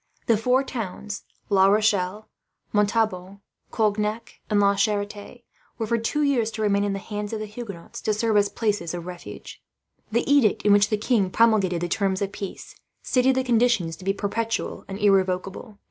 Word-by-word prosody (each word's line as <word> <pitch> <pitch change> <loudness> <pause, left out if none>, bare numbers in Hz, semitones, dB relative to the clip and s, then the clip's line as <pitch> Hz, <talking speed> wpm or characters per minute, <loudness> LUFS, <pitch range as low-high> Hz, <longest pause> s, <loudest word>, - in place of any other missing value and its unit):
The 230 - +4
four 250 +5 +2
towns, 210 -4 -6 0.2
La 195 -2 +5
Rochelle, 205 -1 +1 0.5
Montauban, 200 -2 0 0.3
Cognac, 215 0 -1
and 210 -2 +2
La 200 0 +4
Charite 205 +3 -2 0.3
were, 225 - -2
for 230 +2 0
two 295 +7 0
years, 255 -6 +2
to 220 -1 -4
remain 200 -1 +2
in 205 -1 0
the - - -2
hands 210 +1 -5
of 220 - -2
the 215 - -4
Huguenots, 210 -5 -8
to 215 - 0
serve 220 0 0
as 205 0 +4
places 205 -7 -2
of 170 -1 -6
refuge. 180 -1 -9 0.5
The 235 +2 0
edict, 275 -7 +3
in 205 - +5
which 205 +1 +4
the 215 - +1
king 210 -3 +1
promulgated 195 -5 +3
the 175 - -1
terms 190 +1 0
of 195 - -3
peace, 200 -1 -7 0.3
stated 255 +1 +2
the 260 - +1
conditions 235 -9 +2
to - - -13
be 195 - +1
perpetual 220 +3 -3
and 195 - -6
irrevocable. 195 +1 0
210 Hz, 175 wpm, -24 LUFS, 195-225 Hz, 0.5 s, La